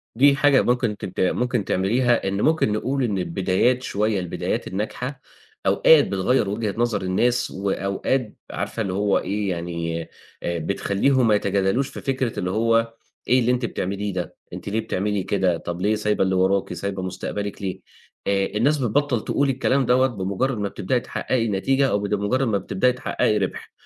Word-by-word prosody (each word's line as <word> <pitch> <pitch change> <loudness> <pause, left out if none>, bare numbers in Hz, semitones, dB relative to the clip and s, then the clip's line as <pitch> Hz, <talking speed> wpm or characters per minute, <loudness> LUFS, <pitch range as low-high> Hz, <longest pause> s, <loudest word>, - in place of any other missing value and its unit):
دي 140 +3 +5
حاجة 140 -1 +4
ممكن 120 -1 +1
أنتِ 105 - -6
ت 95 - -8
ممكن 120 +3 +1
تعمليها، 120 +5 +1
إن 100 +1 -1
ممكن 155 -8 +2
نقول 130 +6 -1
إن 105 -5 0
البدايات 95 +8 +1
شوية 105 0 0
البدايات 90 -2 -3
الناجحة، 125 +7 -4 0.4
أوقات 155 -3 +5
بتغيّر 100 +2 +1
وجهة 105 -1 -2
نظر 120 -2 0
الناس 120 +7 +1
وأوقات 100 +5 -1 0.2
عارفة 115 - -3
اللي 95 -3 -2
هو 100 0 +2
إيه، 100 +1 -2
يعني 85 -1 -3 0.4
آآ 85 -1 -1
بتخلّيهم 100 - +1
ما 105 - +5
يتجادلوش 100 +6 +1
في - - -8
فكرة 130 -3 -1
اللي 90 - -1
هو 115 +2 +2 0.3
إيه 125 - +4
اللي 125 0 +2
أنتِ 125 -1 0
بتعمليه 100 -1 -3
ده؟ 90 -1 -4 0.2
أنتِ - - -6
ليه 110 - 0
بتعملي 100 -2 -1
كده؟ 95 -4 +1
طَب 85 +1 -6
ليه 105 +2 +2
سايبة 105 -2 +1
اللي 95 0 +1
وراكِ، 95 0 +1
سايبة 95 +2 -4
مستقبلِك 100 +2 -4
ليه؟ 95 -2 -3 0.5
آآ 100 -1 +2
الناس 135 +8 +1
بتبطّل 130 -1 0
تقول 140 -1 +1
الكلام 135 0 +1
دوّة 130 +2 +4
بمُجرّد 110 +3 -2
ما 100 -1 -2
بتبدئي 120 +8 -1
تحقّقي 120 -1 -1
نتيجة 135 +7 +1
أو 100 - +1
بد 100 0 -2
مُجرّد 110 +6 +1
ما 105 -3 +2
بتبدئي 95 +5 +1
تحقّقي 105 -3 0
رِبْح. 95 -2 -3
105 Hz, 175 wpm, -23 LUFS, 95-125 Hz, 0.5 s, دي